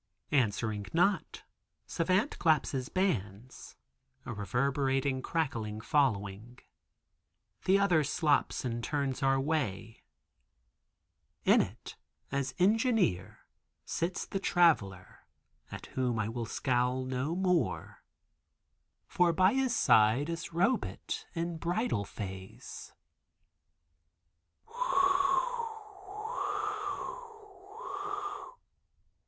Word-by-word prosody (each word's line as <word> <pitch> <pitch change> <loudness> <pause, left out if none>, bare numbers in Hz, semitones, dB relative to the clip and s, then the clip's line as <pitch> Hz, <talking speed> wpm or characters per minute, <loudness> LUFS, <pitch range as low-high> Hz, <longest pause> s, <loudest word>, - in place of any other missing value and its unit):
Answering 110 -5 0
not, 185 +4 +1 0.4
Savant 185 - 0
claps 155 -4 +3
his 130 -2 -3
bands, 120 - -2 0.5
a - - -4
reverberating 135 +5 0
crackling 115 -10 -2
following. 115 -4 0 1.1
The 190 +1 +5
other 180 -6 +3
slops 145 -1 +1
and 120 -1 -3
turns 140 0 -1
our 135 0 +3
way. 130 -7 -2 1.4
In - - +6
it, - - -7 0.3
as 135 -2 -2
Engineer, 205 - +2 0.4
sits 175 +2 -2
the 195 - -3
Traveler, 150 - +2 0.5
at - - -7
whom 125 -3 0
I 110 0 -1
will 115 0 -4
scowl 125 +1 0
no 130 +5 -2
more, 175 - 0 1.0
for 175 -1 +2
by 185 +4 +4
his 260 -2 +1
side 110 - +4
is 165 0 -4
Robet, 195 +10 -1
in 170 0 -2
bridal 175 - -1
phase. 95 -2 -8
135 Hz, 80 wpm, -31 LUFS, 115-170 Hz, 1.4 s, In